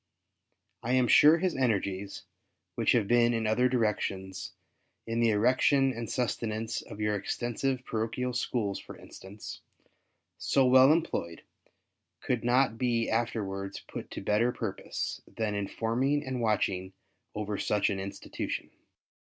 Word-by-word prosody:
I 120 +2 -1
am 130 -1 +4
sure 155 +6 +7
his 185 +1 0
energies, 100 -6 -1 0.5
which - - +2
have 115 -5 +2
been 120 0 +4
in 115 -1 -1
other 125 +4 +3
directions 95 -5 -2 0.3
— - - -47
in 115 0 -2
the 115 -1 +4
erection 130 +5 +3
and 115 -2 -5
sustenance 115 -2 -2
of - - -11
your 105 0 +1
extensive 120 +5 -2
Parochial 115 +3 -2
Schools, 115 -5 -1
for - - -11
instance 100 +2 -10 0.4
— - - -47 0.3
so 135 - +3
well 130 +2 +7
employed, 120 - -1 0.8
could 125 -2 -1
not 120 -2 +2
be 120 -2 +1
afterwards 100 -4 -2
put - - -8
to - - -6
better 115 +4 +2
purpose 115 -5 -4
than 110 -2 -3
in 100 -1 -2
forming 130 +8 0
and 130 -2 -3
watching 95 -4 0 0.4
over 105 -1 -3
such 105 -1 +1
an 95 - -2
institution. 100 +1 -5
115 Hz, 140 wpm, -29 LUFS, 105-125 Hz, 0.8 s, sure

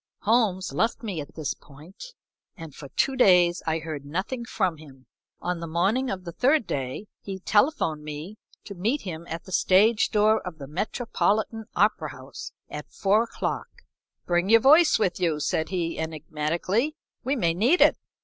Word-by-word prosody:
Holmes 210 -4 +1
left 230 +1 0
me 195 -8 -3
at 145 - -11
this 155 -3 -2
point, 175 - -14 0.4
and 165 -4 -9
for 140 0 -10
two 270 - 0
days 180 -7 +5
I 160 0 +1
heard 155 -3 -6
nothing 190 - -4
from 180 -7 -1
him. 135 -4 -15 0.4
On 180 -1 -2
the 170 - -5
morning 195 +11 +1
of 185 -1 -4
the 170 - -6
third 265 - +2
day 135 +7 -4 0.2
he 195 -1 -6
telephoned 195 - +1
me 155 +8 -7 0.2
to 200 - -8
meet 220 +10 -1
him 170 -2 -6
at 165 0 -5
the 190 - -13
stage 210 +5 +4
door 215 +1 +3
of 180 -4 -8
the 140 - -8
Metropolitan 220 - -1
Opera 175 -6 +1
House 130 +1 -9 0.2
at 150 0 -8
four 205 +3 +2
o'clock. - - -3 0.6
"Bring 175 +2 +1
your 230 0 +7
voice 305 +5 +6
with 195 -5 0
you," 165 -4 0
said 160 +1 -1
he, 170 -3 -2
enigmatically, 160 - -2 0.3
"we 270 +3 0
may 170 -10 +1
need 240 - +3
it." - - +5
185 Hz, 170 wpm, -26 LUFS, 160-220 Hz, 0.6 s, your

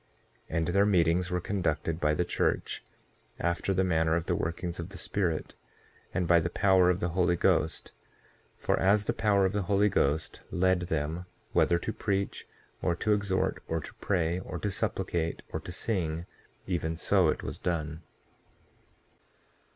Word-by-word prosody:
6:9 80 - -2
And 80 -1 +1
their 100 +3 +4
meetings 90 -2 +3
were 90 - 0
conducted 80 -4 -1
by 75 0 +2
the 90 - +1
church - - -1 0.6
after 85 +3 0
the 95 0 +2
manner 80 -3 +2
of 85 0 -1
the - - 0
workings 85 +1 -3
of 85 +2 -5
the 100 - -9
Spirit, 90 -3 -1 0.6
and 90 -3 -1
by 85 0 +6
the 85 +1 -1
power 95 0 +4
of 90 +1 +1
the 90 - 0
Holy 90 0 +2
Ghost; - - +1 0.7
for - - 0
as 100 +2 +3
the - - 0
power 100 -3 +3
of 95 - 0
the 105 - 0
Holy 100 +2 +3
Ghost 75 -2 0
led 95 0 +2
them 80 +4 -2 0.3
whether 85 - +4
to 110 +5 -3
preach, 100 -2 -2 0.3
or 85 - +1
to 105 +4 +1
exhort, 100 -2 0
or 80 - -1
to 75 - -9
pray, 85 -2 +1
or 90 -1 -6
to 100 +5 -2
supplicate, 85 -3 -2
or - - -1
to - - -8
sing, 85 -4 -1 0.4
even 80 -3 -2
so 95 +1 +3
it - - -1
was - - -5
done. 80 -2 -2
90 Hz, 170 wpm, -29 LUFS, 80-95 Hz, 0.7 s, by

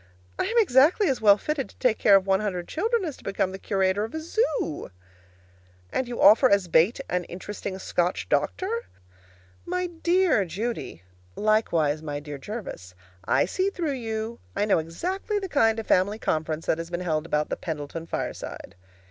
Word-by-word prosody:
I - - +1
am 475 - -1
exactly 360 - +5
as 265 - -1
well 205 -2 +7
fitted 290 +4 -3
to - - -20
take 235 -3 +1
care 200 - +6
of 195 -1 +4
one 190 -1 +3
hundred 185 -5 -3
children 445 +4 0
as 305 -5 -4
to - - -18
become 195 -1 -1
the 190 - -7
curator 195 0 +1
of 225 +7 -5
a - - -2
zoo. 315 - -1 1.0
And 260 - 0
you 240 -1 -5
offer 220 +6 +7
as 200 -2 +3
bait 175 - +3
an 180 0 -1
interesting 190 +2 -6
Scotch 180 -1 -1
doctor? 460 +5 -1 0.8
My 360 +1 -2
dear 345 - +2
Judy, 190 - -4 0.3
likewise 170 -9 +1
my 145 -2 -4
dear 145 -1 -8
Jervis, 135 - -7 0.3
I - - +3
see 380 +1 0
through 340 -6 -2
you! 225 -2 -4 0.2
I 205 - +1
know 205 - +3
exactly 365 - -3
the 390 -2 -3
kind 225 -9 +3
of 225 - -4
family 200 +4 +2
conference 155 -4 -2
that 160 - +1
has 165 0 -5
been 175 0 -3
held 160 -2 -1
about 150 -2 0
the - - -1
Pendleton 160 0 -5
fireside. - - -5
210 Hz, 180 wpm, -26 LUFS, -, 1.0 s, well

